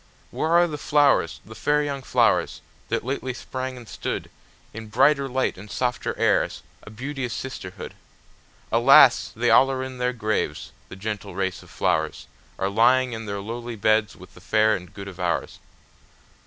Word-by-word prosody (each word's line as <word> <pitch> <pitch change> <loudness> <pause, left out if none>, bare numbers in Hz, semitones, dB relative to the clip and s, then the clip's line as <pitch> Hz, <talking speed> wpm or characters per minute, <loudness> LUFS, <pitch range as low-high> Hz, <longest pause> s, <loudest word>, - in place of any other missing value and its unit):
Where 160 - -2
are 170 +1 +5
the 150 -3 -6
flowers, 140 - +2
the 110 - -11
fair 150 +6 +1
young 140 -2 -3
flowers, - - +1 0.3
that - - -1
lately 130 -1 -3
sprang 130 0 -5
and 120 - -11
stoodIn - - -4 0.6
brighter 140 +5 +3
light 130 -6 -1
and 105 +2 -11
softer 125 +2 -2
airs, - - +1 0.2
a - - -12
beauteous 125 +2 -5
sisterhood? 95 -8 -7 0.8
Alas! - - +6
they - - +1
all 135 - +6
are 130 -1 -2
in 130 -1 -7
their 125 0 +1
graves, 110 -3 -2 0.2
the - - -9
gentle 105 0 -5
race 95 -1 -2
of - - -17
flowersAre 85 +4 -3
lying 125 +3 +4
in 115 -1 -6
their 100 0 -4
lowly 120 +3 -6
beds 110 0 +1
with 90 +1 -15
the 90 - -16
fair 110 +3 +3
and 90 -2 -9
good 100 -1 -8
of 95 -2 -10
ours. 90 -1 -2
115 Hz, 165 wpm, -24 LUFS, 100-130 Hz, 0.8 s, Alas